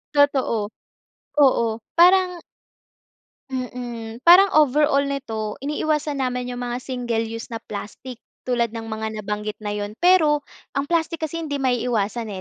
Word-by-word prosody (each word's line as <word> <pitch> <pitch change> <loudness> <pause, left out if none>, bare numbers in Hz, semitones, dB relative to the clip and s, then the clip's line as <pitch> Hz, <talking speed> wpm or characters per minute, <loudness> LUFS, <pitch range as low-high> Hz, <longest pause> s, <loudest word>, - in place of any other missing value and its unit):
Totoo, 260 -7 +2 0.7
oo, 230 -4 +2 0.2
parang 360 0 +5 1.1
Mm, 240 -3 -5
parang 375 +3 +8
overall 290 -1 +4
nito 225 -7 -3
iniiwasan 300 0 -1
namin 250 -1 -2
yung 245 0 -4
mga 245 +1 -3
single 240 -3 -2
use 230 0 -6
na 225 - -5
plastic 220 +4 -8 0.2
tulad 235 -2 -1
ng 225 -1 -5
mga 220 0 -4
nabanggit 210 +1 -4
na 210 - -4
yun. 205 0 -4
Pero 315 -5 +5 0.3
ang 275 +1 -1
plastic 330 -1 0
kasi 330 +2 -3
hindi 285 -1 -2
maiiwasan 235 -3 0
250 Hz, 130 wpm, -22 LUFS, 225-295 Hz, 1.1 s, parang